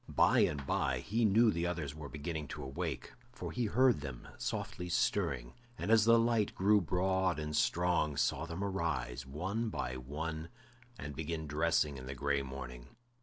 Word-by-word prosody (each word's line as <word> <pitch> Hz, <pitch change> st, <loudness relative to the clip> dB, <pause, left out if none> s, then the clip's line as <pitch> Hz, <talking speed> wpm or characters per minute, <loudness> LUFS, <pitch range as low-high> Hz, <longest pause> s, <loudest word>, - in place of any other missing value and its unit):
By -, -, +4 dB
and 70 Hz, -2 st, +2 dB
by 65 Hz, -1 st, +1 dB
he 110 Hz, -, 0 dB
knew 110 Hz, +2 st, +5 dB
the 85 Hz, +1 st, -1 dB
others 80 Hz, -5 st, -3 dB
were 75 Hz, -2 st, -8 dB
beginning 75 Hz, 0 st, -4 dB
to -, -, -6 dB
awake, 65 Hz, 0 st, -4 dB, 0.2 s
for 125 Hz, -, -6 dB
he 125 Hz, -, -1 dB
heard 125 Hz, -, +4 dB
them 70 Hz, -4 st, -7 dB
softly 90 Hz, +1 st, -3 dB
stirring, -, -, 0 dB, 0.2 s
and 95 Hz, +6 st, -2 dB
as 110 Hz, -2 st, +6 dB
the 115 Hz, 0 st, +7 dB
light 115 Hz, -2 st, +2 dB
grew 105 Hz, +2 st, +4 dB
broad 90 Hz, +1 st, +1 dB
and 75 Hz, 0 st, -3 dB
strong, 85 Hz, -4 st, +2 dB
saw 80 Hz, +2 st, +1 dB
them 85 Hz, +4 st, -4 dB
arise, 70 Hz, -10 st, -2 dB
one 95 Hz, -, -2 dB
by 65 Hz, -10 st, -3 dB
one, 80 Hz, +5 st, -5 dB, 0.5 s
and 70 Hz, -4 st, -6 dB
begin 80 Hz, +1 st, -3 dB
dressing 75 Hz, -1 st, +1 dB
in 65 Hz, 0 st, -8 dB
the 70 Hz, -, -5 dB
gray 70 Hz, +1 st, +1 dB
morning. 65 Hz, -2 st, -7 dB
80 Hz, 170 wpm, -34 LUFS, 70-95 Hz, 0.5 s, the